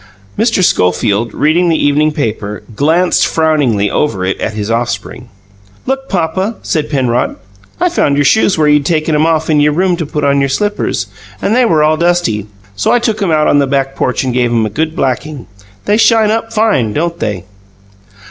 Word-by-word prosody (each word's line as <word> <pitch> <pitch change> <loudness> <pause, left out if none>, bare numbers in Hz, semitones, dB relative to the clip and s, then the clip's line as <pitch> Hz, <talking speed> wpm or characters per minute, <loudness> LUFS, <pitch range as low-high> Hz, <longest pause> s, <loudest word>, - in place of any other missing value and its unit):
Mr. 220 -3 +1
Schofield, 100 - +1
reading 165 +7 +1
the 160 - +2
evening 150 +2 +2
paper, 105 -7 -4
glanced 165 +7 +2
frowningly 145 -11 +1
over 100 -11 -1
it 95 - -3
at - - -2
his 105 +1 -3
offspring. 115 +1 -3 0.6
"Look, 270 +1 -3
papa," 190 +5 -1
said 150 -2 -2
Penrod. 125 -4 0 0.4
"I 360 - +2
found 315 - +1
your 145 0 +1
shoes 195 +6 +3
where 155 -1 +2
you'd 150 -1 +3
taken 155 +1 0
'em 150 +2 +2
off 160 -1 0
in 155 -2 +2
your 150 0 +3
room, 180 +2 +1
to 165 -4 -4
put 150 0 -3
on 140 0 +2
your 140 0 0
slippers, 205 +9 -1 0.3
and 215 - 0
they 250 0 +4
were 160 -8 +2
all 155 +1 +2
dusty. 170 - 0 0.3
So 100 - 0
I 245 - +4
took 225 -3 -1
'em 195 - 0
out 155 -1 +2
on 145 - +3
the 140 - +1
back 135 0 -1
porch 125 - -1
and 130 -2 -2
gave 125 -1 +1
'em 115 -2 +1
a 110 - -4
good 160 +8 -2
blacking. 135 0 -3 0.4
They 205 +1 +2
shine 225 -2 +3
up 225 0 -2
fine, 210 - +1
don't 170 +2 -2
they?" 105 -4 -3
150 Hz, 195 wpm, -13 LUFS, 125-175 Hz, 0.6 s, they